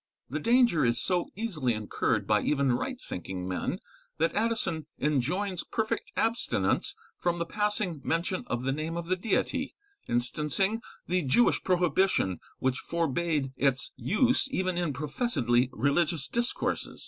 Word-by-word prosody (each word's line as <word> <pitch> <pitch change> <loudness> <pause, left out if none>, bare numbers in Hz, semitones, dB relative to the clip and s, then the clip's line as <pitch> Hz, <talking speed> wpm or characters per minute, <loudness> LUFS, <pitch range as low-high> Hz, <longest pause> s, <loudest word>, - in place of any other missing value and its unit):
The 150 - -1
danger 235 - +4
is 120 -1 +2
so 180 -2 +1
easily 165 - -1
incurred 110 -1 0
by - - +3
even 140 -3 +2
right 250 - -2
thinking 90 - -5
men, 90 -1 -2 0.4
that 165 +1 +1
Addison 210 -8 0
enjoins 170 +7 0
perfect 220 -1 -2
abstinence 235 - +1 0.2
from 175 -1 0
the 170 - -1
passing 205 -4 -1
mention 170 +4 -1
of 120 +1 -2
the 135 - +1
name 155 +4 -3
of 170 0 -5
the 185 - +3
Deity, 230 +7 -1 0.3
instancing 150 - +1 0.2
the 180 +1 +1
Jewish 155 - +3
prohibition 180 - +2 0.2
which 130 0 0
forbad 165 -4 -1
its 135 -2 +1
use 255 +6 +2
even 185 -8 0
in 175 -3 0
professedly 140 - +1
religious 145 +5 +1
discourses. 240 +1 -2
170 Hz, 135 wpm, -29 LUFS, 135-200 Hz, 0.4 s, danger